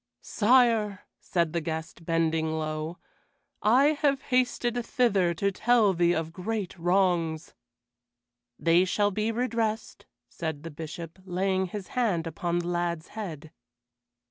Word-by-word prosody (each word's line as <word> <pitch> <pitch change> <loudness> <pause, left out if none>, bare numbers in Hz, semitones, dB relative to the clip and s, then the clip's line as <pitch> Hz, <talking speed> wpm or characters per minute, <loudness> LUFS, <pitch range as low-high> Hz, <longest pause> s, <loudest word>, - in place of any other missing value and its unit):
"Sire," 225 -3 +3 0.2
said 170 -3 -1
the 170 - 0
guest, 160 +1 -5
bending 160 -1 +1
low, 155 +1 -3 0.6
"I 255 +7 +5
have 285 -2 +1
hasted 245 -2 0
thither 200 -10 +2
to 200 +4 0
tell 220 -1 +3
thee 175 0 +3
of 160 0 -3
great 195 +1 -3
wrongs." 175 -3 +1 1.0
"They 170 +2 +4
shall 205 +2 +1
be 215 +3 -1
redressed," 225 -2 -2 0.2
said 160 -4 -5
the 165 - -7
Bishop, 160 +3 -8
laying 190 +1 0
his 195 +1 -7
hand 205 -10 0
upon 170 +1 -2
the 175 0 -2
lad's 175 -2 -2
head. 160 -8 -7
180 Hz, 125 wpm, -27 LUFS, 165-220 Hz, 1.0 s, I